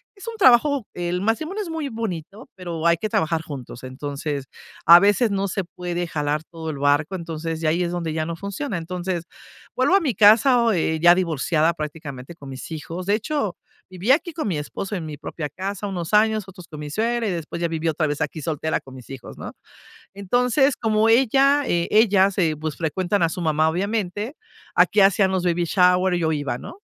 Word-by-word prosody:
es 395 +2 -12
un 460 - -5
trabajo, 270 - +4
el 175 +1 -2
matrimonio 310 - -1
es 360 - -8
muy 320 -3 -3
bonito, 220 - -6
pero 170 -3 -5
hay 170 0 +4
que 215 - -3
trabajar 160 -3 0
juntos. 135 -6 -9
Entonces, 140 +1 -5 0.4
a 170 +1 +10
veces 205 +4 +3
no 200 0 0
se 195 +1 -2
puede 175 0 -4
jalar 150 -2 -2
todo 160 0 -8
el 145 -3 -5
barco, 145 +5 +1
entonces 165 -2 -5
ya 155 - +2
ahí 170 +3 +1
es 170 - -2
donde 170 -2 -3
ya 155 0 -1
no 170 +1 -4
funciona. 200 - -4
Entonces, 175 +1 -4 0.5
vuelvo 380 - +3
a 395 - +4
mi 285 -7 0
casa 230 +5 +6
o 230 -1 +3
eh, 160 -3 0
ya 175 +1 +7
divorciada 165 -2 +1
prácticamente 150 -2 -7
con 140 -4 -11
mis 130 -1 -8
hijos. 165 +3 -6
De 205 - +3
hecho, 225 - -2 0.3
viví 185 +6 -1
aquí 335 +5 +2
con 315 -8 -3
mi 170 - -1
esposo 195 +7 -5
en 175 -4 -4
mi 150 -1 -7
propia 150 0 -6
casa 195 +6 -5
unos 175 -3 -5
años, 215 0 +3
otros 180 -2 -12
con 155 -3 -10
mi 150 0 -6
suegra 230 +5 0
y - - 0
después 170 -1 -5
ya 170 - +1
viví 165 0 -3
otra 160 0 0
vez 145 +1 -3
aquí 150 +1 -3
soltera 160 +1 -2
con 135 - -14
mis 130 -2 -13
hijos, 135 -3 -9
¿no? - - -7 0.6
Entonces, 250 +7 +2
como 220 -1 +2
ella, 270 +4 +4
eh, 170 -7 0
ella 200 -3 +4
se, 165 -5 0
pues 155 0 -4
se - - -23
frecuentan 175 +3 0
a 165 - +3
su 175 - -5
mamá 155 -1 +2
obviamente, 205 - -2 0.4
aquí 210 - +4
hacían 195 0 +4
los 190 -2 -1
babyshowers 180 +1 +2
y - - -2
yo 160 -1 +1
iba 145 -5 -2
no, 350 - -10
175 Hz, 210 wpm, -22 LUFS, 160-215 Hz, 0.6 s, a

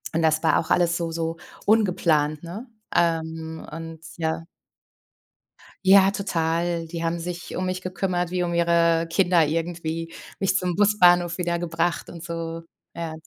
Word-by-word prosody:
und 165 - +2
das 160 0 +2
war 160 - +4
auch 160 - -4
alles 170 -1 +3
so 165 -1 -3
so 165 0 -3 0.3
ungeplant, 165 -8 +2
ne? 200 +10 -7 0.3
Ähm, 160 -1 -1
und, 165 0 -7 0.2
ja 160 0 -2 1.4
Ja, 195 0 +7
total. 170 -3 -1
Die 170 0 -5
haben 165 +1 -1
sich 175 0 -6
um 185 - -2
mich 185 0 -2
gekümmert, 180 -1 -2
wie 180 -1 0
um 170 - -2
ihre 170 -1 +3
Kinder 175 -3 +4
irgendwie, 165 +1 -3 0.3
mich 195 -1 +1
zum 180 -2 -1
Busbahnhof 175 -4 +4
wieder 170 -1 -1
gebracht 170 0 -1
und 170 -1 -9
so, 165 -1 -5 0.3
ja. 165 -1 -4
170 Hz, 150 wpm, -24 LUFS, 165-180 Hz, 1.4 s, Ja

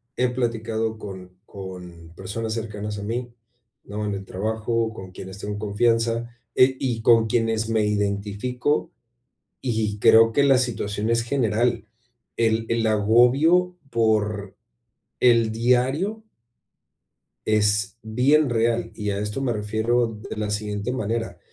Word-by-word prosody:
he 125 0 +1
platicado 115 -2 -2
con 95 -3 -10
con 90 -4 -9
personas 110 +4 -4
cercanas 105 -2 -5
a 100 - -6
mí, 120 +3 -3 0.5
¿no? 105 +1 -5
En 105 -1 -2
el 95 - -7
trabajo, 110 +4 -1
con 95 -4 -10
quienes 95 +1 -9
tengo 105 0 -5
confianza 115 +2 0 0.2
e 130 +1 +5
y 120 -4 -2
con 115 -1 +5
quienes 115 -1 0
me 110 -2 +2
identifico, 105 +7 -1 0.7
y 110 -4 -2
creo 115 +1 +6
que 140 +4 +3
la 135 -2 +5
situación 110 -3 -2
es 115 0 +2
general, 120 -2 0 0.5
el 115 0 +1
el 115 -1 +1
agobio 125 - +4
por 105 -3 0 0.6
el 115 -3 +4
diario 130 - +1 1.2
es 105 0 +1
bien 130 +6 +3
real, 115 0 0
y 105 -1 -3
a 100 - -1
esto 105 +5 -3
me 130 -3 0
refiero 110 +3 0
d 110 -2 -9
de - - -5
la 105 -1 -2
siguiente 105 +2 -3
manera, 115 -1 -3
110 Hz, 135 wpm, -24 LUFS, 105-120 Hz, 1.2 s, creo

